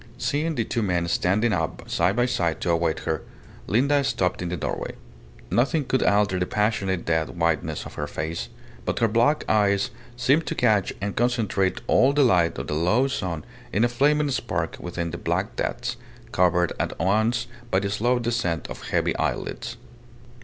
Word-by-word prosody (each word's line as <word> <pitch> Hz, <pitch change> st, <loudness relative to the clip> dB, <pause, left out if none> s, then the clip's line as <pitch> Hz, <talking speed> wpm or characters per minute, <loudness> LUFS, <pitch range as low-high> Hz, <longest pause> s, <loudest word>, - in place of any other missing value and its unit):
Seeing 150 Hz, +5 st, -1 dB
the 115 Hz, -, +1 dB
two 115 Hz, -, -2 dB
men 90 Hz, -4 st, 0 dB
standing 100 Hz, +7 st, +2 dB
up 80 Hz, -4 st, -2 dB
side 90 Hz, +4 st, +1 dB
by 120 Hz, +1 st, +3 dB
side 85 Hz, -9 st, 0 dB
to 85 Hz, -, +1 dB
await 85 Hz, -1 st, +1 dB
her, 80 Hz, -1 st, -2 dB, 0.5 s
Linda 140 Hz, +6 st, +3 dB
stopped 90 Hz, -10 st, 0 dB
in 90 Hz, -, -2 dB
the 90 Hz, -, -2 dB
doorway. -, -, -3 dB, 0.6 s
Nothing 140 Hz, +5 st, +2 dB
could 130 Hz, 0 st, +1 dB
alter 100 Hz, -2 st, +3 dB
the 90 Hz, -, 0 dB
passionate 100 Hz, -4 st, 0 dB
dead 80 Hz, +1 st, 0 dB
whiteness 85 Hz, -2 st, 0 dB
of -, -, -9 dB
her 75 Hz, -, -4 dB
face; 80 Hz, -5 st, -4 dB, 0.3 s
but -, -, -2 dB
her 115 Hz, -, +3 dB
black 120 Hz, +8 st, +2 dB
eyes 100 Hz, -2 st, +2 dB, 0.3 s
seemed 140 Hz, +6 st, +2 dB
to 165 Hz, -, -2 dB
catch 105 Hz, -8 st, +2 dB
and 100 Hz, 0 st, -2 dB
concentrate 110 Hz, -6 st, +1 dB
all 135 Hz, +2 st, +4 dB
the 145 Hz, 0 st, +4 dB
light 90 Hz, -9 st, +3 dB
of -, -, -4 dB
the -, -, -3 dB
low 90 Hz, -, +2 dB
sun 90 Hz, -, -3 dB, 0.3 s
in 105 Hz, -, +2 dB
a -, -, +5 dB
flaming 145 Hz, +4 st, +2 dB
spark 130 Hz, -, -2 dB
within 85 Hz, -1 st, -4 dB
the 85 Hz, -, -6 dB
black 95 Hz, +7 st, -1 dB
depths, 120 Hz, 0 st, -2 dB, 0.3 s
covered 90 Hz, -2 st, +2 dB
at -, -, -2 dB
once 110 Hz, +6 st, +1 dB, 0.2 s
by 95 Hz, -, +2 dB
the 100 Hz, 0 st, -2 dB
slow 120 Hz, +5 st, +2 dB
descent 115 Hz, -9 st, -1 dB
of -, -, -7 dB
heavy -, -, +1 dB
eyelids. -, -, -3 dB
100 Hz, 180 wpm, -25 LUFS, 85-120 Hz, 0.6 s, a